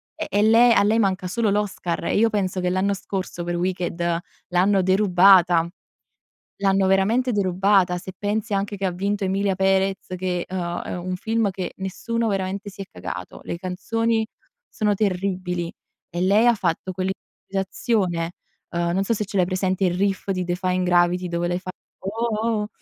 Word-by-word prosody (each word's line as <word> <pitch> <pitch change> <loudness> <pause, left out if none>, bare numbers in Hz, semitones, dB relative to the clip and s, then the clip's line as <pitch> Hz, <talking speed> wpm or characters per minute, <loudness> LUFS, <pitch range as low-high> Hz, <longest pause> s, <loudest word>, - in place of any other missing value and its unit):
e 315 0 -4
e 205 - +2
le 230 +2 +6
a 200 - +4
lei 215 +3 +3
manca 190 -3 +1
solo 220 +4 0
l'Oscar 190 -5 -2
e - - +1
io 225 +1 +4
penso 190 -3 -1
che 180 - 0
l'anno 190 +2 +1
scorso 185 -3 -4
per 175 - -2
Wicked 175 -1 -1 0.3
l'hanno 190 +2 +3
derubata, 185 -3 +5 1.0
l'hanno 195 -1 +3
veramente 220 +7 +2
derubata 190 -2 +2
se 185 +1 -8
pensi 210 +2 -2
anche 200 +1 -1
che 195 - -4
ha 180 - -1
vinto 200 +3 -1
Emilia 195 0 0
Pérez 195 0 +1
che 180 -1 -2
è 185 - -8
uhm, 175 -1 -2
è - - -5
un 180 +1 -3
film 225 +2 0
che 185 -1 -5
nessuno 225 +5 -2
veramente 195 +1 -2
si 200 - -13
è 195 - -3
cagato. 90 0 -7
Le - - -4
canzoni 220 +5 -1 0.4
sono 210 -1 0
terribili 185 -3 -1 0.4
e 175 - -4
lei 205 +5 +4
ha 240 - +6
fatto 185 -1 -2 0.6
quell'improvvisazione, 190 -3 -1 0.4
uhm, 170 0 0
non 190 +2 +1
so 215 +4 +1
se 210 - -2
ce 200 - -6
l'hai 185 - +4
presente 185 +1 0
il 175 - +2
riff 195 0 0
di 185 -1 -1
Defying 180 +1 -1
Gravity 180 0 +3
dove 170 0 -1
lei 175 0 0
fa: 185 0 -7 0.3
"Uoh 220 +3 -2
oh 225 0 0
oh," 210 - -4
190 Hz, 180 wpm, -23 LUFS, 180-205 Hz, 1.0 s, le